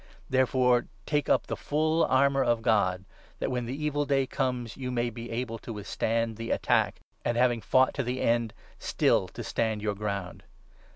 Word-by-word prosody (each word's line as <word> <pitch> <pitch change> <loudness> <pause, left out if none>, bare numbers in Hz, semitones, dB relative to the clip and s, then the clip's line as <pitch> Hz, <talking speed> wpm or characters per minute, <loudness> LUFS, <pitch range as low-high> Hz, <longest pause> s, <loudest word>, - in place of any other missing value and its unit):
Therefore 125 -1 +3 0.2
take 150 -2 0
up - - +3
the - - -3
full 155 +2 +1
armour 135 +1 +3
of 120 -2 +1
God, 95 -5 +2 0.3
that, - - -2
when 125 -2 -2
the 140 +5 -4
evil 145 -1 +1
day 140 -2 +1
comes, 125 -4 -2
you 130 -2 -5
may 120 -1 -1
be 115 +1 -8
able 115 -1 -3
to - - -8
with 105 -3 -7
stand 115 0 -1
the 115 0 -5
attack, - - +1 0.2
and, 120 - 0
having 120 -2 +3
fought 130 +5 +3
to 140 - -1
the 125 +1 -2
end, 115 -1 +1 0.2
still - - +2
to - - -8
stand 110 -2 -1
your 105 -1 0
ground. 100 -3 -4
120 Hz, 185 wpm, -28 LUFS, 115-130 Hz, 0.3 s, Therefore